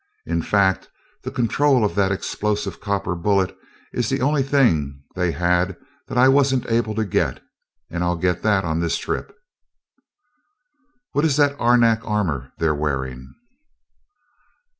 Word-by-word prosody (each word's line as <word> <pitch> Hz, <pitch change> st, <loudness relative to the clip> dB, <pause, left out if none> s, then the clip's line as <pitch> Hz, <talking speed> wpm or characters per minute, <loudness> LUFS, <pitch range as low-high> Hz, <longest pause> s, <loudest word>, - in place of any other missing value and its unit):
In 85 Hz, 0 st, -1 dB
fact, 95 Hz, 0 st, +1 dB, 0.3 s
the -, -, -5 dB
control 130 Hz, 0 st, +2 dB
of 105 Hz, -, -1 dB
that 100 Hz, -1 st, +1 dB
explosive 100 Hz, 0 st, -2 dB
copper 100 Hz, -3 st, -1 dB
bullet 95 Hz, +2 st, 0 dB, 0.4 s
is -, -, -1 dB
the -, -, 0 dB
only 145 Hz, +2 st, +2 dB
thing 80 Hz, -, +1 dB
they 90 Hz, -2 st, 0 dB
had 90 Hz, +1 st, 0 dB, 0.3 s
that -, -, -4 dB
I 125 Hz, +1 st, +6 dB
wasn't 135 Hz, -2 st, +3 dB
able 115 Hz, -2 st, 0 dB
to 110 Hz, 0 st, 0 dB
get 100 Hz, -, -1 dB, 0.4 s
and 85 Hz, +2 st, -3 dB
I'll 90 Hz, 0 st, +1 dB
get 90 Hz, 0 st, -1 dB
that 105 Hz, -4 st, +2 dB
on 80 Hz, 0 st, -1 dB
this 85 Hz, -1 st, 0 dB
trip." -, -, -4 dB, 1.8 s
"What 145 Hz, -, 0 dB
is 155 Hz, -3 st, +2 dB
that 145 Hz, -1 st, +3 dB
arenak 120 Hz, -2 st, +4 dB
armor 85 Hz, -, -2 dB
they're 80 Hz, -2 st, +1 dB
wearing?" 65 Hz, -4 st, -4 dB
100 Hz, 140 wpm, -22 LUFS, 85-120 Hz, 1.8 s, I